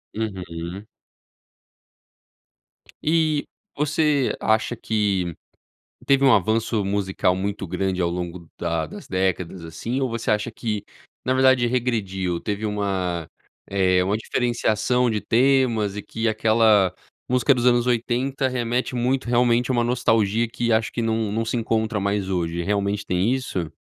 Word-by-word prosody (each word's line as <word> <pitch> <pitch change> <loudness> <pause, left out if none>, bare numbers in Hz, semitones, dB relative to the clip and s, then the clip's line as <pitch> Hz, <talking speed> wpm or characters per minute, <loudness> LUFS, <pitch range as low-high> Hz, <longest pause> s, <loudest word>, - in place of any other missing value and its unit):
Uhum. 95 -3 -5 2.2
E 155 -2 +2 0.3
você 150 -2 +2
acha 110 +2 +1
que 100 -7 0 0.7
teve 140 0 +4
um 135 - +7
avanço 110 +2 +2
musical 95 -2 0
muito 100 +1 -3
grande 95 +1 -2
ao 85 - +2
longo 85 -1 -5
da 85 -2 -1
das - - -10
décadas, 95 -1 -1
assim? 115 +11 -4
Ou 130 - 0
você 115 -1 -2
acha 105 +2 0
que 105 -3 -4 0.4
na 130 - +1
verdade 130 -2 +4
regrediu, 100 -8 -1
teve 105 +1 -3
uma, 95 -5 -2 0.4
eh, 95 -2 +2
uma 100 +3 0
diferenciação 120 +1 0
de 105 -1 -1
temas 120 -5 +2
e 105 - -4
que 115 +2 -3
aquela 110 -3 +3 0.3
música 125 +3 +3
dos 125 0 0
anos 120 0 +4
80 125 +3 0
remete 125 0 -1
muito, 125 +1 0
realmente 120 +1 +2
a - - +4
uma 120 0 +2
nostalgia, 115 -2 +1
que 120 0 -1
acho 110 0 +2
que 120 - -3
não 110 -2 0
não 115 +2 -1
se 120 +2 -1
encontra 110 -1 0
mais 100 -1 -1
hoje. 85 -1 -1
Realmente 100 +1 -1
tem 95 +8 +1
isso? 90 - -3
110 Hz, 140 wpm, -23 LUFS, 95-120 Hz, 2.2 s, um